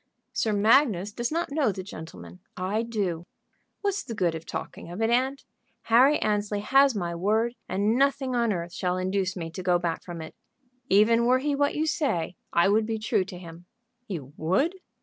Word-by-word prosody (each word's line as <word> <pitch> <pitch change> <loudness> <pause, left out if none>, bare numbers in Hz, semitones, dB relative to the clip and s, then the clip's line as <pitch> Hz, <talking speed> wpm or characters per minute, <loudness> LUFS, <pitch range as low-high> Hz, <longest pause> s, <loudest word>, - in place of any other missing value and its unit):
"Sir 220 - 0
Magnus 210 -2 +3
does 240 +3 -2
not 335 -1 -1
know 285 -6 +2
the 190 0 -6
gentleman; 125 - -10 0.2
I 190 +4 -1
do. 200 -8 -2 0.6
What's 405 0 -1
the 230 - -6
good 180 -5 +1
of 165 0 -7
talking - - -6
of 175 +4 -7
it, 225 +1 +1
aunt? 265 +3 +1 0.4
Harry 255 +6 +5
Annesley 210 -1 -1
has 270 +3 +4
my 175 -4 -2
word, 215 +7 +1 0.2
and 205 +4 +1
nothing 270 -1 +1
on 235 -2 +2
earth 175 -2 -4
shall 180 0 -1
induce 185 0 -1
me 165 -3 -5
to 175 - -6
go 180 -1 +3
back 170 -1 -2
from 175 -2 -7
it. 160 0 -8 0.6
Even 230 +4 +4
were 255 +1 +5
he 290 +3 -1
what 285 0 +1
you 310 - 0
say 270 - -1 0.2
I 170 +2 +4
would 215 +2 +2
be 225 -1 -1
true 215 -3 +1
to 185 -1 -9
him." 170 0 -12 0.4
"You 145 -8 -6
would?" 190 - +1
205 Hz, 190 wpm, -26 LUFS, 175-245 Hz, 0.6 s, Harry